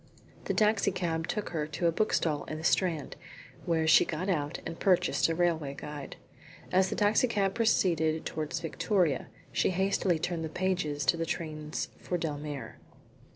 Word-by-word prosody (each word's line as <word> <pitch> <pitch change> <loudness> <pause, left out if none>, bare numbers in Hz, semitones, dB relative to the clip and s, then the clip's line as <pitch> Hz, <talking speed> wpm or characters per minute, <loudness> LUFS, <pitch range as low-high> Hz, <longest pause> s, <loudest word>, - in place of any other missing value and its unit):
The - - -1
taxi 215 -1 +3
cab 170 -3 -2
took 210 - -2
her 155 -3 -2
to 155 +3 -3
a 170 - +5
bookstall 165 -5 +1
in 155 - -5
the 160 - -8
Strand, 165 -4 +1 0.5
where 165 -2 +2
she 160 - +7
got 175 +4 -3
out 150 -5 -1
and 165 - -6
purchased 185 -3 +3
a 165 - 0
railway 160 -5 0
guide. 150 -1 -7 0.6
As 185 +1 +3
the - - -2
taxi 210 +4 +3
cab 200 -4 +1
proceeded 170 -8 +2
towards 155 +2 -3
Victoria 170 - 0 0.2
she - - +2
hastily 190 -1 +1
turned 165 +1 -2
the 160 - -3
pages 175 -5 -1
to 170 - +3
the 165 - -1
trains 155 -2 -4
for 180 - -2
Dellmere. 150 -3 -5
165 Hz, 165 wpm, -30 LUFS, 155-185 Hz, 0.6 s, she